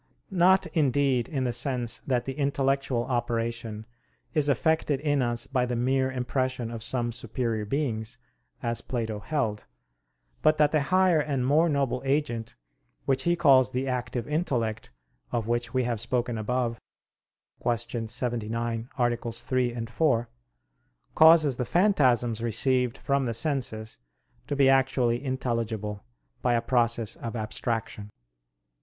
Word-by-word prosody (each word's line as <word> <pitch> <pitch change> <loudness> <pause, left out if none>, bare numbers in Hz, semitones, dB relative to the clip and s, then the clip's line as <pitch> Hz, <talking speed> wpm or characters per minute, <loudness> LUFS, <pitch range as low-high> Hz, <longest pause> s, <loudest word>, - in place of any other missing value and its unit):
Not, 185 +1 +4
indeed, 140 -4 +2
in 135 -4 -1
the 125 -1 -1
sense 120 -1 -1
that 125 -3 +1
the 135 - -3
intellectual 135 -3 0
operation 115 -3 -2 0.5
is 145 -1 +2
effected 150 +1 +1
in 145 -1 +1
us 120 -1 -1
by 125 -2 0
the 120 - -2
mere 130 +2 +1
impression 130 -1 -2
of 115 -1 -6
some 120 +1 -1
superior 115 -1 -2
beings, 115 -2 -2 0.5
as 115 -1 0
Plato 110 -4 -3
held; 110 -4 -2 0.8
but 155 0 +4
that 150 -1 +4
the 155 - +2
higher 185 -3 +4
and 140 -4 -1
more 155 +5 +4
noble 140 -3 0
agent 135 -5 -1 0.5
which 135 0 +1
he 175 0 +3
calls 135 -6 +5
the 130 +2 -1
active 125 -2 -3
intellect, 125 -9 -1 0.4
of 115 -3 -1
which 120 0 -1
we 130 +1 +1
have 120 -2 -1
spoken 120 +1 -1
above 115 +1 -1 0.8
(Q. 120 -1 -2
79, 115 0 -3
AA. 120 -2 +2
3, 120 0 -2
4) 120 0 +1 0.8
causes 160 -5 +6
the 125 - 0
phantasms 125 - +2
received 125 +2 +1
from 140 -2 0
the 115 - -2
senses 115 -4 -2 0.5
to - - -2
be 140 -1 +4
actually 130 -2 +2
intelligible, 115 -6 -3 0.4
by 120 -1 +2
a 115 - +2
process 115 -3 +1
of 115 0 -6
abstraction. 110 -1 -3
125 Hz, 135 wpm, -27 LUFS, 115-135 Hz, 0.8 s, causes